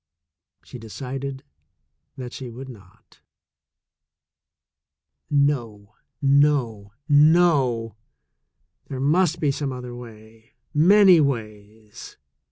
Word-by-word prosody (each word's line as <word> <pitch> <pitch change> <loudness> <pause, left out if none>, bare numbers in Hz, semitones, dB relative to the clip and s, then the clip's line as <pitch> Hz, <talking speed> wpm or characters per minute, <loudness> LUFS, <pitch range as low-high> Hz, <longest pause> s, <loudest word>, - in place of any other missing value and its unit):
She 125 - -11
decided 130 +4 -7 0.7
that 125 -2 -8
she 130 -2 -8
would 130 +3 -10
not. 100 -7 -17 2.1
No, 120 -8 -1 0.3
no, 135 -8 +1 0.2
no! 145 - +3 0.9
There 130 - -6
must 165 +4 +1
be 150 -3 +1
some 140 0 -4
other 125 -1 -8
way 115 -1 -14
— - - -48
many 185 +3 +6
ways. 110 -5 -6
130 Hz, 85 wpm, -23 LUFS, 115-145 Hz, 2.1 s, many